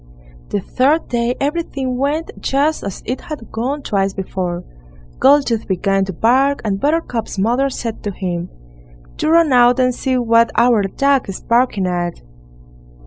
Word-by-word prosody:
The 205 - -1
third 280 - +1
day 240 0 0
everything 275 -3 -2
went 290 +5 -1
just 290 +3 0
as 200 -2 -6
it 255 - -3
had 290 -7 -8
gone 270 +6 -3
twice 195 -1 0
before; 180 -2 -3 0.6
Goldtooth 270 -5 +3
began 195 +1 +1
to 190 - -4
bark, 265 +9 +2
and 195 -2 -1
Buttercup's 285 -8 -1
mother 240 +7 +1
said 230 -4 -5
to 205 - -1
him: 180 -2 -4 0.7
"Do - - 0
run 330 -3 +4
out 245 0 +5
and 255 0 +3
see 260 +1 -1
what 230 -1 +3
our 235 -2 +4
dog 270 +6 +1
is 190 - -6
barking 235 -5 +1
at." 175 -1 -2
240 Hz, 150 wpm, -18 LUFS, 195-275 Hz, 0.7 s, out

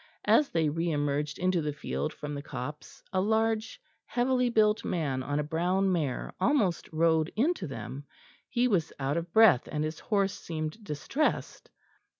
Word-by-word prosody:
As 295 - +4
they 160 -2 +1
re 165 +3 -1
emerged 145 -1 -1
into 185 -1 +1
the 150 -1 -2
field 155 +1 -3
from 150 -1 -6
the 140 - -4
copse, 145 +1 -7
a 185 - +2
large 220 +1 0 0.3
heavily 250 0 +1
built 215 -2 +3
man 140 -7 -1
on 145 +2 -2
a 150 - +1
brown 180 +5 +1
mare 150 -8 -1
almost 205 - +1
rode 160 0 +2
into 265 - +1
them. 135 +2 -7 0.4
He 245 +1 +2
was 175 -9 +1
out 140 +1 -1
of 170 0 -4
breath, 220 - +6
and 150 0 -1
his 155 0 -4
horse 200 -3 +1
seemed 155 +5 -5
distressed. 175 - -2
165 Hz, 160 wpm, -29 LUFS, 150-215 Hz, 0.4 s, breath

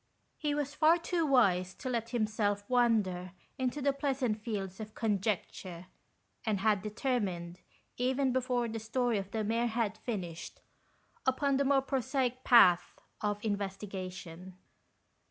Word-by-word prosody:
He 295 -2 0
was 290 -1 -2
far 310 +3 +5
too 335 -1 -1
wise 185 -9 +3
to - - -7
let 235 -2 -1
himself 215 -3 0
wander 210 -8 +2 0.3
into 260 +2 -1
the 280 0 +3
pleasant 265 -6 -1
fields 195 -4 -4
of 215 0 -8
conjecture, 195 -4 -2 0.6
and 210 -4 0
had 210 -2 +3
determined, 200 -6 -2 0.4
even 260 +1 +1
before 250 -2 0
the 225 0 -4
story 230 0 0
of 195 0 -6
the 220 +1 -2
mare 230 +3 +1
had 220 -2 -1
finished, 185 - -5 0.7
upon 270 +1 +2
the 280 - +2
more 270 -1 +3
prosaic 260 -1 -1
path 185 -8 +6 0.2
of 205 0 -2
investigation. 190 -3 -5
225 Hz, 135 wpm, -32 LUFS, 195-255 Hz, 0.7 s, path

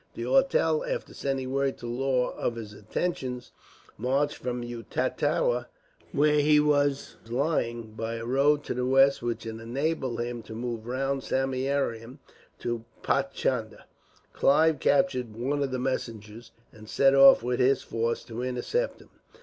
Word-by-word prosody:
D'Auteuil, - - +2
after - - -4
sending 135 -2 -3
word 135 0 0
to - - -10
Law 125 +1 0
of 120 - -2
his 110 -3 -7
intentions, 130 -2 -4 0.5
marched 135 +5 0
from 125 -1 -4
Utatua, 120 - -1 0.4
where 150 -1 +3
he 150 +1 +5
was 145 -2 +1
lying, 120 -4 -1
by 115 +1 -4
a 115 0 -5
road 140 +4 +2
to - - -3
the 125 - -2
west 135 +1 +4
which 115 -1 -3
would 110 0 -6
enable 130 +1 -2
him 120 0 -3
to 110 - -10
move 115 -1 -4
round 135 +2 -1
Samieaveram 130 -3 -1 0.4
to 120 -1 -3 0.2
Paichandah. - - -1 0.5
Clive 155 +1 +3
captured 130 -9 +1
one 140 +4 -1
of 140 - 0
the 130 - -2
messengers, 115 -3 -4 0.2
and 110 0 -14
set 135 0 +4
off 135 -3 +8
with 125 +1 -1
his 130 +2 +3
force 115 +1 -2
to 115 +1 -6
intercept 130 - -2
him. - - -19
130 Hz, 145 wpm, -27 LUFS, 120-140 Hz, 0.5 s, off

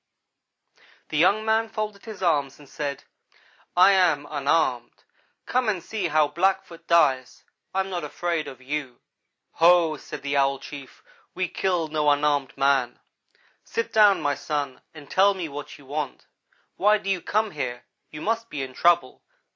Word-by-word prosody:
"The 155 - -2
young 200 +6 +3
man 220 0 +1
folded 215 -2 -5
his 215 -4 -8
arms 145 -6 +1
and 145 - -16
said: 140 0 -5 0.7
'I 185 +2 +8
am 170 -7 +3
unarmed 140 -4 0 0.4
come 250 -2 +1
and 185 -5 -2
see 210 -5 -2
how 155 -1 +3
a 145 - -8
Blackfoot 175 -1 -1
dies. 135 -7 +2 0.3
I 190 - +1
am 190 0 -5
not 175 -3 -3
afraid 165 +1 -2
of 130 - -9
you.' 135 -3 -4 0.5
"'Ho!' 165 -2 +4
said 140 - -9
the 140 0 -1
Owl 135 0 +2
chief, 140 -1 -11 0.3
'we 185 -2 -1
kill 180 -4 -1
no 150 -1 +1
unarmed 145 -2 +1
man. 135 -3 +1 0.6
Sit 460 0 -3
down, 210 -2 +5
my 145 - +1
son, 145 -1 -4
and 150 -3 -13
tell 200 +1 +3
me 180 -3 -4
what 145 0 -8
you 140 - -17
want. 145 0 -5 0.5
Why 210 +2 +4
do 205 - -10
you 185 -3 -1
come 215 +4 0
here? 125 -5 -5 0.2
You 150 - -9
must 230 +1 -1
be 140 -2 -4
in 130 -1 -7
trouble. 175 +4 +2
155 Hz, 165 wpm, -25 LUFS, 140-190 Hz, 0.7 s, I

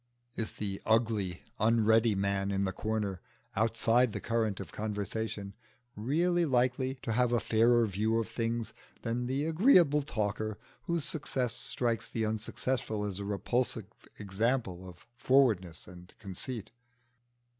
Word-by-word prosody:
Is 110 - -3
the 100 -2 -4
ugly 110 -5 +1 0.2
unready 110 0 +4
man 100 0 0
in 100 0 0
the 95 - 0
corner, 105 -1 -2 0.3
outside 115 +2 +3
the - - -3
current 115 -3 -1
of 95 - -7
conversation, 105 -1 -4 0.4
really 170 +10 +1
likely 130 -2 +1
to 115 - -2
have 125 +1 +2
a 120 - +3
fairer 115 +1 +4
view 110 +3 0
of 115 - 0
things 115 0 -2 0.3
than 120 +2 -1
the 135 +3 0
agreeable 165 - +5
talker, 110 -5 -2 0.3
whose 170 -3 0
success 130 -5 -2
strikes 120 -2 -2
the 110 -1 -1
unsuccessful 110 0 -2
as 100 -2 -4
a 100 - -4
repulsive 110 +4 -1 0.3
example 100 -2 -1
of 85 -2 -15
forwardness 110 -12 +2
and 90 0 -13
conceit? 110 +2 -6
110 Hz, 135 wpm, -31 LUFS, 100-125 Hz, 0.4 s, agreeable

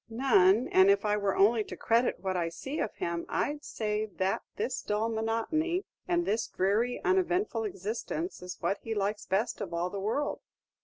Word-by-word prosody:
"None; 225 -3 +4
and 190 +1 +6
if 200 +1 +3
I 210 0 +2
were 200 -2 0
only 215 +3 +4
to - - -8
credit 230 -2 +2
what 190 -1 -1
I 170 -2 0
see 270 - -5
of 220 - -2
him, 170 0 -2
I 290 - 0
'd 295 0 -11
say 215 0 -2
that 190 -1 -1
this 245 +5 -2
dull 210 +2 0
monotony 230 - 0 0.2
and 345 -1 +1
this 220 +2 0
dreary 215 +6 +1
uneventful 370 - +1
existence 220 - -4
is 180 0 -7
what 185 +4 -1
he 225 -1 -4
likes 205 +1 -1
best 215 +6 0
of 175 -4 -4
all 175 +2 -1
the 200 - -4
world." 225 +9 -1
215 Hz, 190 wpm, -30 LUFS, 195-245 Hz, 0.2 s, and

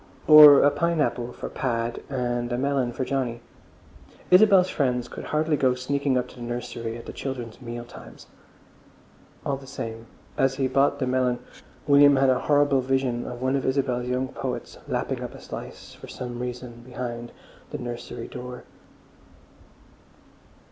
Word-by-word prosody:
Or 150 -2 +10
a 145 - +5
pineapple, 150 -8 0
for - - -7
Pad, 115 -2 -2
and 120 -2 -2
a 120 - 0
melon 135 -2 0
for 130 - -3
Johnny? 125 -4 -2 0.9
Isabel's 190 -1 +7
friends 125 -7 -1
could - - -8
hardly 155 0 +1
go 130 -3 +2
sneaking 135 +1 0
up 125 0 -1
to - - -15
the - - -10
nursery 120 -1 -5
at 115 - -11
the - - -8
children's 125 -3 -6
meal 120 -1 -6
times. - - -13 1.2
All 140 - -1
the 135 0 -13
same, 115 -3 -6 0.3
as 135 0 +2
he 135 -1 0
bought 140 +2 +2
the 135 - -1
melon 125 -1 +1 0.5
William 145 0 +6
had 135 -1 +4
a 125 - +1
horrible 145 -2 +3
vision 130 -2 -1
of 125 +1 -6
one 130 +1 +1
of 135 - -1
Isabel's 130 -2 0
young 130 +1 -1
poets - - -5
lapping - - -2
up - - -6
a - - -10
slice, - - -9
for - - -12
some 120 -1 -6
reason, 125 -1 -6
behind 120 -1 -6 0.4
the - - -5
nursery 120 -1 -6
door. 125 0 -8
125 Hz, 160 wpm, -25 LUFS, 120-140 Hz, 1.2 s, Or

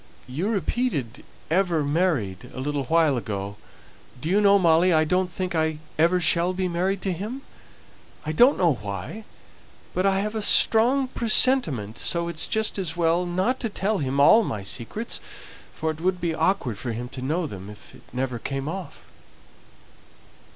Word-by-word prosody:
You 155 +11 -2
repeated 200 - -2 0.3
'Ever 170 -3 +2
married,' 145 - -1
a - - -6
little 140 0 -2
while 160 -2 +3
ago; 100 -3 -5 0.6
do 155 - -4
you 200 +3 +3
know, 200 -1 +6
Molly, 175 0 +4
I 155 -2 +4
don't 180 +3 0
think 185 +1 -3
I 160 -1 0 0.2
ever 170 +3 +4
shall 170 +1 +2
be 185 0 -1
married 185 +2 -1
to 195 - 0
him? 220 +10 -6 0.8
I 155 - -2
don't 245 - +5
know 170 -4 +3
why, 100 - -6 0.7
but 185 +2 +1
I 195 0 +2
have 210 +1 -3
a 220 - -2
strong 245 +6 +4
presentiment, 215 - +3
so 170 0 0
it's 165 -2 -1
just 220 -2 -1
as 175 -3 -3
well 170 +1 +1
not 190 +9 0
to 230 - -2
tell 205 +1 -1
him 140 -1 -1
all 220 +11 +7
my 105 - -4
secrets, 120 - -4 0.5
for 160 0 -2
it 155 0 -9
would 180 +1 0
be 170 -2 -1
awkward 160 - 0
for 120 -3 -4
him 120 +2 -5
to 130 - -8
know 160 +7 -1
them 100 -8 -8
if 105 0 -13
it - - -15
never 125 -1 -3
came 135 +3 -4
off!" 185 +3 -6
170 Hz, 170 wpm, -24 LUFS, 135-195 Hz, 0.8 s, all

